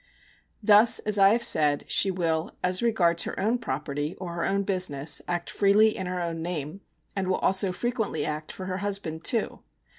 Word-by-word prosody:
Thus, 210 +2 +6
as 210 -1 +1
I 195 0 +7
have 235 +3 +1
said, 150 -10 +2
she 195 - +4
will, 165 -3 -2
as 180 0 +1
regards 180 -8 +2
her - - -5
own 225 +5 0
property 145 - -4
or 180 -2 -7
her 170 - -3
own 200 +1 0
business, 180 -7 -1
act 175 -1 -3
freely 210 +2 +3
in 190 - -5
her 180 0 -3
own 165 -1 -4
name, 165 +1 -5 0.3
and 195 -2 -2
will 185 - +1
also 190 0 +2
frequently 220 - -3
act 150 0 -5
for 185 - -8
her 185 0 -3
husband 190 -5 -4
too. 225 +3 -1
185 Hz, 185 wpm, -26 LUFS, 165-200 Hz, 0.3 s, I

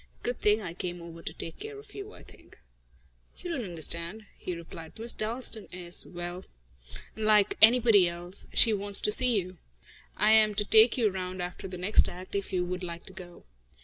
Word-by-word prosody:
Good 245 0 -3
thing 210 +1 +2
I 170 -3 -6
came 175 0 -5
over 165 -1 -11
to - - -4
take 165 - -9
care 430 0 -8
of 415 0 -14
you, 405 +1 -8
I - - -15
think." - - -19 0.8
"You 355 - -7
don't 270 -7 -3
understand," 170 +3 -3
he 180 - -6
replied. 165 0 -11
"Miss 230 +2 +2
Dalstan 225 0 -2
is 175 -1 +1
well, 175 +1 -7 0.7
unlike 215 -1 +2
anybody 225 -4 +6
else. 175 +2 -5
She 225 - +4
wants 200 0 +2
to 210 - +1
see 245 -1 +5
you. 185 -1 -8 0.6
I 215 - +3
am 215 -1 +5
to 210 0 +1
take 220 +4 +5
you 220 -4 +2
round 185 0 -6
after 180 +1 -6
the 185 -1 -8
next 185 +5 +3
act, 180 +1 -11
if 200 -1 -3
you 180 -1 -1
would 180 +1 -5
like 170 -1 -6
to 190 - -11
go." 175 -2 -12
195 Hz, 195 wpm, -28 LUFS, 175-220 Hz, 0.8 s, anybody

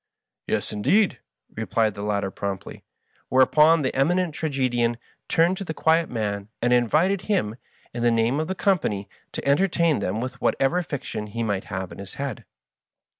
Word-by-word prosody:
" - - -62
Yes, - - -1
indeed,'* 190 - +2 0.4
replied 110 -1 0
the 100 - -7
latter 100 -2 -1
promptly; 100 -1 -5 0.5
whereupon 150 +5 +5
the 130 - -1
Eminent 170 +5 +2
Tragedian 125 -6 0 0.3
turned 170 +3 +3
to 195 - -4
the 160 -4 -5
quiet 160 +2 +2
man, 105 -3 -3
and 120 +1 +2
invited 155 - +3
him, 190 - 0 0.4
in 120 - -4
the 120 - +4
name 115 +4 +2
of 155 - -1
the 190 - -2
company, 155 - 0 0.3
to - - -5
entertain 170 - +3
them 100 +1 -2
with 125 +1 -5
whatever 165 +7 +2
fiction 120 -9 -5
he 115 +2 -3
might 100 -3 -1
have 95 -1 -5
in - - -10
his 100 -1 -9
head. 140 -5 -5
125 Hz, 170 wpm, -24 LUFS, 105-165 Hz, 0.5 s, whereupon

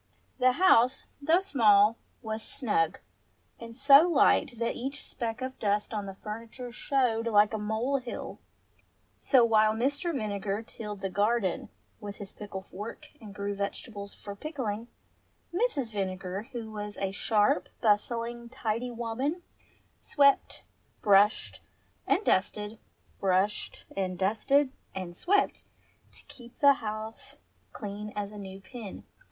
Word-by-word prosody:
The 255 0 +5
house, 260 -7 +4 0.2
though 325 +5 +4
small, 220 - +5 0.3
was 220 0 -3
snug, 200 - 0 0.6
and 230 0 -8
so 280 +6 +7
light 265 -6 +3
that 230 0 -1
each 275 +4 -5
speck 230 +1 -4
of 260 0 -5
dust 210 +1 0
on 205 -2 -3
the 195 - -7
furniture 230 +4 -7
showed 240 -3 0
like 210 -1 +4
a 220 - -1
mole 220 +6 0
hill; 250 -2 -6 0.8
so 255 -4 +5
while 215 -1 +4
Mr. 285 +9 0
Vinegar 210 -5 -2
tilled 210 -3 -8
his 190 -1 -2
garden 205 -1 +1 0.3
with 205 -2 -8
a 200 -2 -6
pickle 200 -2 -7
fork 205 +4 -8
and 205 -3 -10
grew 200 0 -2
vegetables 200 +1 -5
for 200 -1 -9
pickling, 235 -5 -4 0.7
Mrs. 345 - 0
Vinegar, 190 +1 -3
who 230 -3 -6
was 210 -1 -5
a 195 -1 -1
sharp, 205 -2 +2
bustling, 235 +2 0
tidy 235 -1 -2
woman, 245 +8 -3 0.6
swept, 280 -1 +3 0.4
brushed, 205 +1 +4 0.5
and 420 - +2
dusted, 210 +3 0 0.4
brushed 195 +2 0
and 185 -2 -2
dusted 225 +9 +2 0.2
and 180 -2 -5
swept 400 - +1 0.5
to - - -12
keep 240 -1 -15
the 280 -1 +7
house 215 0 -5 0.3
clean 210 -1 -6
as 205 -1 -3
a 210 - -9
new 195 -1 -8
pin. 225 -2 -9
220 Hz, 135 wpm, -29 LUFS, 205-250 Hz, 0.8 s, so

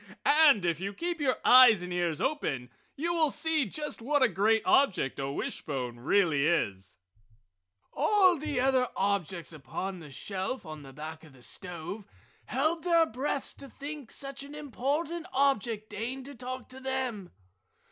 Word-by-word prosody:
And 285 - +6
if 170 -2 0
you 200 +2 -4
keep 345 - -3
your 260 -3 +2
eyes 245 -7 +8
and 180 0 -5
ears 175 -3 0
open 140 - -2 0.2
you 335 +4 -1
will 320 -3 +3
see 315 -2 +1
just 295 +5 -4
what 285 +3 +2
a - - +7
great 215 +3 +2
object 190 - +3
a 135 0 -2
wishbone 125 -4 -4
really 150 0 +3
is!" 95 - -1 1.0
All 385 -4 +4
the 295 -4 -2
other 260 -1 +3
objects 190 -4 -1
upon 185 +5 -5
the 155 -3 -11
shelf 190 - -4
on 155 -1 -8
the 135 -1 -11
back 155 +3 -8
of 155 -4 -15
the 125 -2 -17
stove 180 - -7 0.4
held 310 +7 0
their 335 -2 +4
breaths 270 +2 -3
to 275 - -11
think 285 -2 -8
such 275 -1 -5
an 285 +1 -9
important 300 +4 -2
object 235 -6 +1
deigned 245 +5 -4
to 285 - -8
talk 255 0 -6
to 260 0 -10
them. 260 -7 -3
235 Hz, 160 wpm, -29 LUFS, 170-280 Hz, 1.0 s, eyes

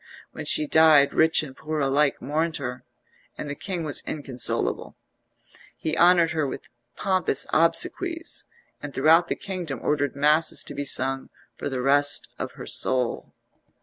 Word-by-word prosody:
When - - -8
she 310 - +2
died 160 - +5
rich 160 0 +3
and 135 -3 -9
poor 155 +1 -4
alike 140 +1 +1
mourned 160 +3 -1
her, 125 -2 -6 0.5
and - - -6
the 145 - -4
king 175 +3 -5
was 150 -3 0
inconsolable. 135 -5 -2 0.8
He 155 0 -3
honoured 170 0 +4
her 155 -3 -1
with - - -8 0.3
pompous 185 -8 0
obsequies, 335 - 0 0.4
and 145 -1 -8
throughout 160 +5 +4
the - - -2
kingdom 175 -9 -5
ordered 145 -3 0
masses 150 +3 +2
to - - -7
be 145 0 -4
sung 135 0 -1 0.3
for - - -5
the 130 -2 -3
rest 145 +1 +3
of - - -5
her - - -9
soul. 125 -2 0
150 Hz, 150 wpm, -24 LUFS, 140-165 Hz, 0.8 s, died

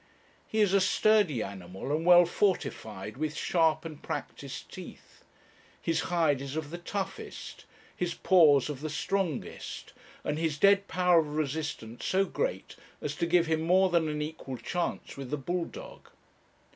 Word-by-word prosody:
He 220 - 0
is 200 -2 +3
a 195 - +5
sturdy 200 - +3
animal, 95 +7 -5
and 165 +2 -2
well 175 0 +8
fortified 110 - -1
with 155 +1 -2
sharp 160 -2 +2
and 155 -3 -8
practised - - -6
teeth; - - -11 0.6
his 165 -1 0
hide 160 -6 +2
is 140 +1 -5
of 155 -2 -4
the 175 - -5
toughest; 195 +2 -6 0.3
his 175 -1 -2
paws 155 -8 +5
of 145 -3 -5
the 155 - -3
strongest, 175 -1 -3 0.3
and 150 +1 -2
his 160 -3 0
dead 200 +4 +5
power 180 0 +4
of 150 -2 -2
resistance 145 -6 -3
so 195 +1 +2
great - - -3 0.2
as - - -4
to 170 - 0
give 175 0 +4
him 160 -1 0
more 185 +3 +4
than 170 -2 +3
an 150 0 -2
equal 150 -4 -6
chance 170 +9 -3
with 135 -2 -6
the 150 - -1
bull 175 +5 -2
dog. - - -11
160 Hz, 160 wpm, -29 LUFS, 145-180 Hz, 0.6 s, well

